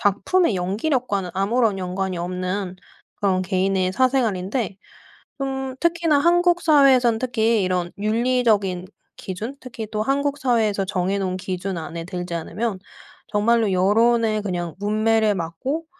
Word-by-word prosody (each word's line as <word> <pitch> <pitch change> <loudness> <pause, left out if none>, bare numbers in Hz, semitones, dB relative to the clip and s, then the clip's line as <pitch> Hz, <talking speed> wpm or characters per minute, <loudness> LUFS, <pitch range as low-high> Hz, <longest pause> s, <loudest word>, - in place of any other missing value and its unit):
작품의 205 - +2
연기력과는 200 - -1
아무런 205 +1 +1
연관이 185 0 -3
없는 185 +1 -3 0.4
그런 185 -2 +1
개인의 185 0 0
사생활인데 225 -5 0 0.7
음 265 -1 -3
특히나 335 -3 +2
한국 350 +2 +3
사회에선 270 -7 +5
특히 230 -4 +1
이런 180 -1 -1
윤리적인 215 -4 +1 0.3
기준 210 +8 -6
특히 240 -4 -7
또 215 0 -1
한국 280 +4 0
사회에서 220 -7 +1
정해 190 +1 -1
놓은 185 -1 -2
기준 185 0 -4
안에 165 +1 -6
들지 180 -1 -5
않으면 190 +5 -3 0.5
정말로 215 0 +2
여론의 215 +3 +3
그냥 175 -5 -4
뭇매를 215 0 +2
맞고 190 - -3
210 Hz, 305 characters per minute, -22 LUFS, 185-250 Hz, 0.7 s, 사회에선